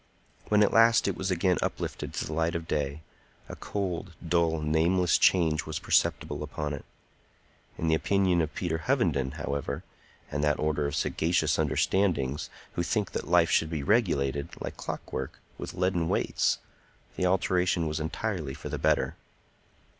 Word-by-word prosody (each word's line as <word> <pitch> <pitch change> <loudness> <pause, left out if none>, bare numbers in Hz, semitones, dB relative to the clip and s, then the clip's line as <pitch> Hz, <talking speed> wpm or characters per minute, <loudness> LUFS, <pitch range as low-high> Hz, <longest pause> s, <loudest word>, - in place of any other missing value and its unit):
When 105 0 +5
at 105 - +2
last 115 -1 +5
it 100 - 0
was 95 - -3
again 90 0 +2
uplifted - - -3
to - - -2
the 80 - -5
light 80 +2 0
of 85 -1 -4
day, 75 +1 -2 0.4
a - - -7
cold, 95 -3 -4
dull, 80 -1 +2
nameless 85 +4 +2
change 80 -4 +3
was 80 - -3
perceptible - - +1
upon 75 0 -4
it. 70 - -7 0.9
In 80 - -2
the 80 - +3
opinion 90 +1 +2
of 80 -1 -3
Peter 80 -3 -1
Hovenden, 80 - +1
however, 70 -2 -3 0.5
and 75 +1 -1
that 75 0 +2
order 75 -1 0
of 70 - -3
sagacious 85 +2 +1
understandings 75 -8 +1 0.2
who - - -1
think 100 +2 -1
that - - -4
life 85 -1 +4
should 80 - +3
be 80 -3 -3
regulated, 70 - +1
like - - -5
clockwork, - - -5 0.2
with - - -6
leaden 90 -2 +1
weights, - - +1 0.6
the 90 - +1
alteration 90 -2 +2
was 75 0 -2
entirely 80 -3 -3
for 75 - -7
the - - -3
better. - - +1
85 Hz, 160 wpm, -28 LUFS, 75-90 Hz, 0.9 s, When